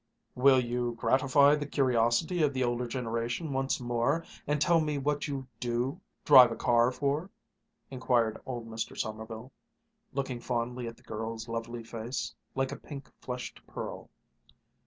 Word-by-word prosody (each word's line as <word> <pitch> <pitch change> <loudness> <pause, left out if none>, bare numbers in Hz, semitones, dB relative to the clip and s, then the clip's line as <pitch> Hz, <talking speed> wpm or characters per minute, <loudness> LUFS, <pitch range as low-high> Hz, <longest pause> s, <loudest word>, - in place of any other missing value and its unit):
"Will 130 +1 +5
you 120 -1 -1
gratify 140 +3 +4
the 145 -1 -1
curiosity 130 +5 +2
of 145 -2 +3
the 130 - +1
older 120 0 0
generation 120 +4 -2
once 135 0 0
more, 120 +6 0 0.2
and 150 +1 +1
tell 170 +2 +4
me 150 -2 -1
what 145 +2 -1
you 135 -2 -4
do 120 +2 -1 0.2
drive 125 -2 +9
a - - -2
car 120 +1 +3
for?" 145 +7 -1 0.6
inquired 120 -4 +1
old 120 -3 -5
Mr. 115 0 -5
Sommerville, 110 +3 -5 0.6
looking 130 -3 -3
fondly 120 0 -2
at 115 - -7
the - - -22
girl's 110 +1 -5
lovely 115 +1 -4
face, 115 +2 -4 0.2
like 135 0 0
a - - -5
pink 140 -2 -9
flushed 125 -1 -6
pearl. - - -6
125 Hz, 150 wpm, -30 LUFS, 115-140 Hz, 0.6 s, drive